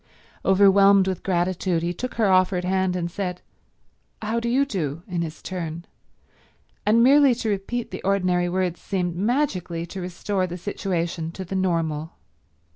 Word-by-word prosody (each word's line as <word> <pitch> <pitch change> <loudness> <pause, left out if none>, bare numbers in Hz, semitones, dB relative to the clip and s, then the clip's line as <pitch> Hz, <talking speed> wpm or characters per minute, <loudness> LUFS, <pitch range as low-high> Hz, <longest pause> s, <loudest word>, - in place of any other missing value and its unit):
Overwhelmed 195 0 +5
with 185 -2 -2
gratitude 180 -1 0
he 175 +1 -1
took 255 +8 -5
her 225 - +2
offered 185 -1 +3
hand 190 0 +1
and 170 -1 -2
said 180 -2 -4 0.8
"How 220 +2 -1
do 235 0 -2
you 270 +4 +3
do," 170 - -3
in 175 -3 -2
his 160 -2 -6
turn, 170 -2 -5 1.0
and 230 +2 +5
merely 275 0 +6
to 230 -2 -3
repeat 210 +4 -3
the 185 - -6
ordinary 180 -2 +1
words 180 -1 -1
seemed 180 -3 -2
magically 185 - -1
to 185 +2 -7
restore 185 +2 -2
the 175 0 -6
situation 170 -3 -3
to 190 - -6
the 190 - -5
normal. 165 -4 -1
185 Hz, 155 wpm, -24 LUFS, 175-200 Hz, 1.0 s, merely